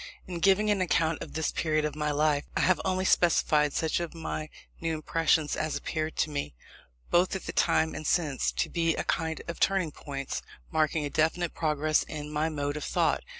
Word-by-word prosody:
In 175 -2 -5
giving 195 +4 +4
an 200 -2 +1
account 165 -2 +1
of - - -7
this 160 0 -1
period 155 -2 0
of 150 - -3
my 150 0 -1
life, 150 0 +1
I - - +2
have 185 - +3
only 185 -1 0
specified 155 -5 +3
such 160 +3 0
of 170 -1 -5
my 155 -1 -4 0.3
new 165 -1 -1
impressions 155 0 +1
as 155 0 -2
appeared 155 0 -3
to 155 - 0
me, 140 - -4 0.6
both 180 +2 +3
at 190 - -5
the - - -3
time 160 0 +2
and 155 - -5
since, 150 -7 +1
to - - 0
be 165 -2 +1
a - - -2
kind 160 -1 -1
of 170 - -5
turning 190 -5 +2
points, 135 -2 -5 0.3
marking 155 -1 +1
a 145 - -4
definite 160 +2 +1
progress 155 -1 +1
in 150 -1 -6
my 155 +2 +1
mode 145 -1 -2
of 150 - -5
thought. - - +1
155 Hz, 200 wpm, -28 LUFS, 150-170 Hz, 0.6 s, giving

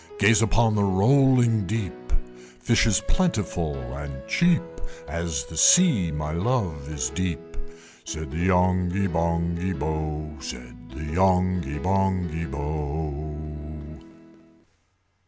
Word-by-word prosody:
Gaze 115 - +5
upon 115 0 +3
the 105 -1 +2
rolling 115 +1 +4
deep 105 - -2 0.7
(Fish 115 - +3
is 110 -1 +3
plentiful 105 - 0 0.2
and 70 -1 -7
cheap); 175 -1 +3 0.4
As 80 -2 -3
the 80 - -11
sea, 115 - +5
my 75 0 -3
love 85 - -1
is 75 -5 -2
deep!" 85 -2 -4 0.5
Said 80 -3 -6
the 80 - -4
Yonghy 90 +1 +2
Bonghy 85 +1 -1
Bò, 75 0 -4
Said 60 0 -9
the - - -8
Yonghy 90 -5 +2
Bonghy 90 -2 0
Bò. 75 +1 -5
85 Hz, 105 wpm, -25 LUFS, 75-95 Hz, 0.7 s, Gaze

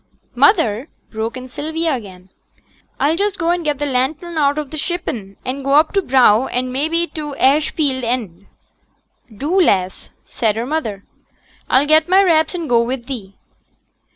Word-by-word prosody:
'Mother,' 270 - +2 0.2
broke 225 +2 -4
in 255 0 -8
Sylvia 320 +4 -2
again, 190 -6 -8 0.7
'I'll 300 +3 +2
just 405 +2 -1
go 335 0 0
and 350 -1 -1
get 295 -2 -1
t' 290 - -2
lantern 285 +6 -2
out 290 -1 +2
of 300 -3 -4
t' 310 - -5
shippen, 265 - -4
and 265 +2 -4
go 275 +1 +2
up 310 +2 +4
t' 395 - +2
brow, 255 - +4
and 255 +1 -2
mebbe 325 +5 -1
to 300 -3 -5
t' - - -14
ash 290 +3 +3
field 270 -5 -1
end.' 215 -6 -3 0.8
'Do, 300 - 0
lass,' 190 - 0 0.2
said 220 -4 -1
her 230 +2 -2
mother. 230 -9 -3 0.7
'I'll 265 +3 +4
get 310 +2 +3
my 380 +2 +5
wraps 320 -2 +2
and 335 -3 -4
go 235 -3 +3
with 240 +1 -3
thee.' 215 -8 -7
275 Hz, 175 wpm, -18 LUFS, 235-320 Hz, 0.8 s, my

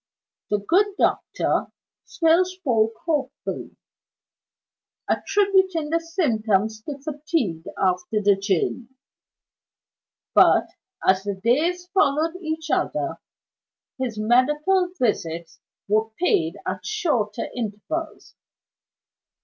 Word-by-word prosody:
The 210 - +2
good 385 - +1
doctor - - +1 0.4
still 330 +1 +3
spoke 260 -13 0
hopefully; 295 -6 -3 1.3
attributing 380 -6 +2
the 330 - +3
symptoms 220 - 0
to 285 - -4
fatigue 285 - -2
after 185 +3 0
the 205 -1 +4
journey. 195 +4 -1 1.5
But, - - +5 0.4
as 190 0 +5
the 200 0 -3
days 305 - +1
followed 320 -2 +2
each 315 -1 -4
other, - - -1 0.8
his 245 -5 -3
medical 295 - +2
visits 170 -8 -1 0.3
were 215 +2 +2
paid 170 - +1
at 185 0 -3
shorter 295 - -1
intervals. 240 +8 -5
260 Hz, 90 wpm, -23 LUFS, 210-330 Hz, 1.5 s, But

